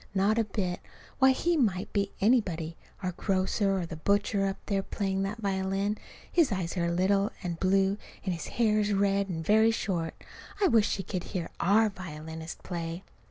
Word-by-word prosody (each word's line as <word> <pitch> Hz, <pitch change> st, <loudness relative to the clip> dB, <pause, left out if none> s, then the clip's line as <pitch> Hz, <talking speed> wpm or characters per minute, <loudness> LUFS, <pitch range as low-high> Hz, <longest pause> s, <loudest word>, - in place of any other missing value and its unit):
Not 205 Hz, +4 st, +3 dB
a 225 Hz, -, +2 dB
bit. 190 Hz, -4 st, -2 dB, 0.4 s
Why, 265 Hz, 0 st, +7 dB
he 340 Hz, +6 st, +2 dB
might 205 Hz, -, 0 dB
be 200 Hz, -1 st, 0 dB
anybody, 180 Hz, -8 st, +2 dB, 0.3 s
our 185 Hz, -, 0 dB
grocer, 195 Hz, +2 st, +1 dB
or 180 Hz, -, -1 dB
the 165 Hz, -1 st, -7 dB
butcher, 200 Hz, +3 st, +1 dB
up 195 Hz, -, -2 dB
there 200 Hz, -2 st, 0 dB
playing 195 Hz, -1 st, -2 dB
that 195 Hz, +3 st, -2 dB
violin. 195 Hz, 0 st, 0 dB, 0.4 s
His 330 Hz, -8 st, +3 dB
eyes 185 Hz, -3 st, -2 dB
are 170 Hz, -2 st, +1 dB
little 195 Hz, +4 st, +2 dB
and 170 Hz, -2 st, -3 dB
blue, 195 Hz, +1 st, +2 dB, 0.3 s
and 185 Hz, -, 0 dB
his 165 Hz, -, -5 dB
hair 215 Hz, -3 st, +3 dB
is 210 Hz, 0 st, +1 dB
red 200 Hz, 0 st, +2 dB
and 160 Hz, -2 st, -4 dB
very 220 Hz, +3 st, +5 dB
short. 180 Hz, -7 st, -1 dB, 0.4 s
I 395 Hz, -3 st, +4 dB
wish 225 Hz, -5 st, +4 dB
she 195 Hz, -, -1 dB
could 185 Hz, -2 st, -4 dB
hear 175 Hz, -3 st, -4 dB
our 210 Hz, +4 st, +4 dB
violinist 160 Hz, -3 st, -8 dB
play! 170 Hz, 0 st, -4 dB
195 Hz, 180 wpm, -29 LUFS, 180-210 Hz, 0.4 s, Why